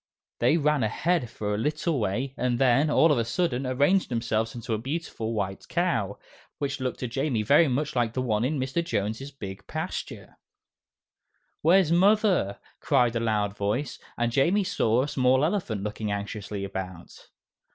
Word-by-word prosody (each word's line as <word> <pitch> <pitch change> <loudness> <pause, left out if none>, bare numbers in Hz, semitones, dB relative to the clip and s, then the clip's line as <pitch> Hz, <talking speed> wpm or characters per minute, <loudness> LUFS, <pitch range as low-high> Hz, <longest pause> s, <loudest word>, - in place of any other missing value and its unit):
They 125 +7 +4
ran 150 -2 +2
ahead 135 +5 0
for 105 -1 -3
a 105 - -1
little 150 +3 0
way 120 +6 -1
and 125 -2 0
then, 135 +4 +3
all 160 +2 +5
of 140 - +2
a - - +2
sudden, 130 0 -1
arranged 145 +9 +2
themselves 115 -2 -1
into 115 -1 -4
a 110 - -1
beautiful 130 -4 -4
white 95 -3 -3
cow, 115 - 0 0.4
which 140 0 -3
looked 130 -1 -3
to 125 - -1
Jamie 125 -2 -1
very 145 +9 +5
much 140 +3 -1
like 120 -2 +1
the 130 - -1
one 110 -3 0
in 140 +3 0
Mr. 135 +6 -1
Jones' 110 - -2
big 100 -8 -9
pasture. - - -6 1.2
"Where's 175 +1 +4
Mother?" 190 - +3 0.2
cried 120 -1 +2
a - - +1
loud 105 -3 0
voice, 115 +7 -2 0.2
and 120 0 0
Jamie 170 - +3
saw 125 - +1
a - - -2
small 130 0 +3
elephant 155 - -2
looking 105 0 -3
anxiously 100 0 -4
about. 95 -3 -7
125 Hz, 165 wpm, -26 LUFS, 110-150 Hz, 1.2 s, all